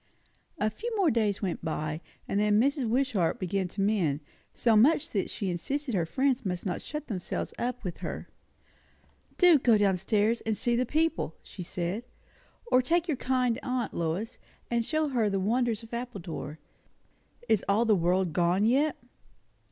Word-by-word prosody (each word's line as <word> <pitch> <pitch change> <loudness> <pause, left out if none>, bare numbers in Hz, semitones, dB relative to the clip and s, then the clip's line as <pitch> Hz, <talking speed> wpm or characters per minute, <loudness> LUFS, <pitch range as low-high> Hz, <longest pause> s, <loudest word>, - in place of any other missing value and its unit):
A 215 -6 +1
few 470 - -5
more 375 -6 +4
days 215 -3 0
went 180 -4 -2
by; 155 -1 -3 0.3
and 200 - 0
then 210 0 +3
Mrs. 270 -1 +1
Wishart 230 -9 +1
began 185 +1 -1
to 195 +3 -5
mend; 180 -8 +1 0.3
so 230 -2 +2
much 270 +8 +4
that 195 -3 -1
she 195 -3 -3
insisted 270 - -3
her 170 -5 +1
friends 265 +6 +1
must 180 -2 -3
not 180 - -2
shut 300 +1 -6
themselves 190 -9 -4
up 250 0 -2
with 180 -4 -4
her. - - -5 1.1
"Do 355 -5 +7
go 235 -4 +4
down 200 -2 +3
stairs 210 +5 +1
and 220 -2 -1
see 240 -2 +1
the 250 +1 +1
people!" 320 - 0
she 190 - -10
said; 180 +5 -3 0.7
"or 255 - +6
take 335 +7 +1
your 305 -5 0
kind 255 -2 +1
aunt, 250 -2 -2
Lois, 170 +9 -2 0.3
and 235 -1 +2
show 310 +4 0
her 235 -6 +1
the 195 -1 0
wonders 230 +2 0
of 225 - -13
Appledore. 195 - -5 0.9
Is 215 - +3
all 215 +4 +3
the 220 - +4
world 180 -1 +1
gone 175 +5 +2
yet?" 280 +6 +3
220 Hz, 170 wpm, -29 LUFS, 185-255 Hz, 1.1 s, Do